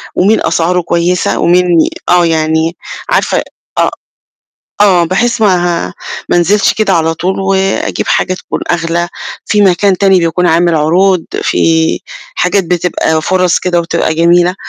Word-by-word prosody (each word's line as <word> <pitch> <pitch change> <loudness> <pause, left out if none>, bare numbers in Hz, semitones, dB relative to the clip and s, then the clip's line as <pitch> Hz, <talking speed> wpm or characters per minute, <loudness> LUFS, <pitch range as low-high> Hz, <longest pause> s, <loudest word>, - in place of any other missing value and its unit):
ومين 205 +4 +2
أسعاره 175 +2 0
كويسة، 170 +1 -1
ومين 180 +1 +3 0.4
آه 175 -1 +4
يعني 160 +1 0 0.3
عارفة - - 0 0.3
آه، - - +2 0.9
آه 185 -4 +4
بحيث 230 +7 -1
ما 175 -4 +1
ه - - -11 0.4
ما - - +1
أنزلش 195 +4 +2
كده 215 -3 0
على 165 -1 +1
طول، 185 +4 -3
وأجيب 195 0 -1
حاجة 185 - 0
تكون - - -6
أغلى، 170 0 -1 0.4
في 210 -1 +2
مكان 190 0 +2
تاني 195 -2 +3
بيكون 175 +1 0
عامل 170 0 +2
عروض، 175 +4 +2 0.2
في 160 0 +1 0.3
حاجات 180 +1 0
بتبقى 165 -2 -1
فرص 185 -1 +1
كده 175 -2 0
وتبقى 160 -1 -1
جميلة، 175 +2 +2
175 Hz, 140 wpm, -11 LUFS, 165-190 Hz, 0.9 s, آه